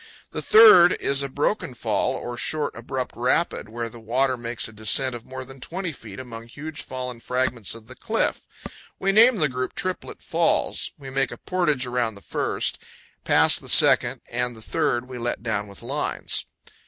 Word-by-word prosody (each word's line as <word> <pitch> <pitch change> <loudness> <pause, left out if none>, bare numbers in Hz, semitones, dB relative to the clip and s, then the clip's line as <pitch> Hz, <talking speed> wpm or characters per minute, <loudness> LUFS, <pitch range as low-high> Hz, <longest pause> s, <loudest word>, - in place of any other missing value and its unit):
The - - -3
third 430 - +8
is 140 0 0
a 140 - -3
broken 145 0 -1
fall, - - 0
or 120 - -5
short, 150 +4 -2
abrupt 125 +2 -4
rapid, 125 0 0
where 115 +1 -4
the 115 +1 -11
water 130 +4 +1
makes 120 -1 -3
a 110 - -13
descent 110 +5 +3
of 120 -1 -9
more 130 0 -7
than 135 +1 -13
20 180 +6 -4
feet 110 -8 -11
among 115 -2 -9
huge, 150 +5 -7
fallen 125 -2 -6
fragments 125 -4 -1
of 115 -1 -12
the 130 - -10
cliff. - - -1 0.5
We 195 - +1
name 230 +5 +6
the 155 -7 +2
group 130 -1 -4
Triplet 185 -2 -4
Falls. - - +1
We 135 -2 -9
make 135 -1 0
a - - -7
portage 155 -8 0
around 120 -3 -1
the 100 - -13
first; - - -2 0.5
past - - +4
the - - -8
second - - +5
and 125 0 -2
the 110 - -12
third 125 -3 0
we 125 -1 -7
let 120 -1 -3
down 105 -3 -2
with 100 +2 -14
lines. 140 +5 -3
125 Hz, 185 wpm, -24 LUFS, 115-145 Hz, 0.5 s, third